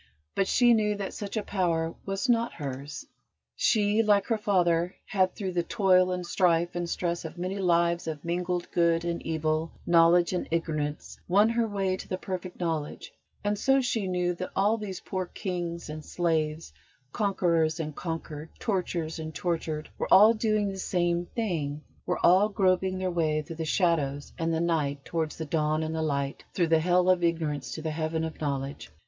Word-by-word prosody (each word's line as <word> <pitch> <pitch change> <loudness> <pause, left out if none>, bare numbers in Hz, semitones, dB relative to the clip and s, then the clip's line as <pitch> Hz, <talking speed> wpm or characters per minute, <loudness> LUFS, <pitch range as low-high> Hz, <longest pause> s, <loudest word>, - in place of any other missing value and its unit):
But 195 - +1
she 240 -1 +5
knew 210 -2 +2
that 200 -1 -5
such 205 +1 -5
a 215 - -1
power 165 -5 0
was 195 +5 -1
not 235 -1 +2
hers. 140 0 -6 0.5
She, 210 0 +3
like 205 -2 +3
her 225 - 0
father, 180 -4 +2
had, 185 -3 +1
through 190 -3 -3
the 175 -1 +1
toil 185 -2 +3
and 180 -1 -3
strife 170 -1 +2
and 175 -1 -3
stress 170 -1 -2
of 160 - -8
many 185 +3 -3
lives 170 -2 +2
of 155 -1 -5
mingled 175 +1 -1
good 170 -1 +2
and 170 0 -2
evil, 160 0 -1
knowledge 170 +1 +5
and 180 - -2
ignorance, 155 -3 -3
won 205 +5 +4
her 230 0 +1
way 195 -3 -1
to - - -9
the 185 - -2
Perfect 185 -1 -6
Knowledge; 160 -4 -3 0.3
and 205 0 0
so 270 +3 +4
she 230 -6 -1
knew 180 -1 0
that 185 +1 -5
all 205 +3 +3
these 205 -5 -6
poor 185 -1 -3
kings 175 -2 -4
and 155 0 -7
slaves, 160 - -1 0.4
conquerors 170 -6 +1
and 155 -2 -4
conquered, 160 -2 -5
torturers 175 -6 -2
and 155 -1 -6
tortured, 155 0 -2
were - - -3
all 215 +4 +8
doing 215 -2 +1
the 195 0 -6
same 175 -1 0
thing, 155 -10 -2 0.2
were - - 0
all 190 +4 +6
groping 185 -1 +1
their 185 -1 -1
way 155 -3 0
through 165 +1 -9
the 160 - -3
shadows 150 -5 0
and 165 0 0
the 160 - 0
night 145 -5 0
towards 160 -3 -2
the 160 - -4
dawn 155 0 0
and 160 0 -3
the 160 - -2
light, 140 -3 -2
through 175 - +3
the 165 -1 +5
hell 180 +2 +3
of 185 -1 +3
ignorance 160 -4 -1
to 155 - -6
the 160 - -2
heaven 160 +1 -2
of 160 -1 -5
knowledge. 140 - -3
175 Hz, 185 wpm, -28 LUFS, 160-190 Hz, 0.5 s, all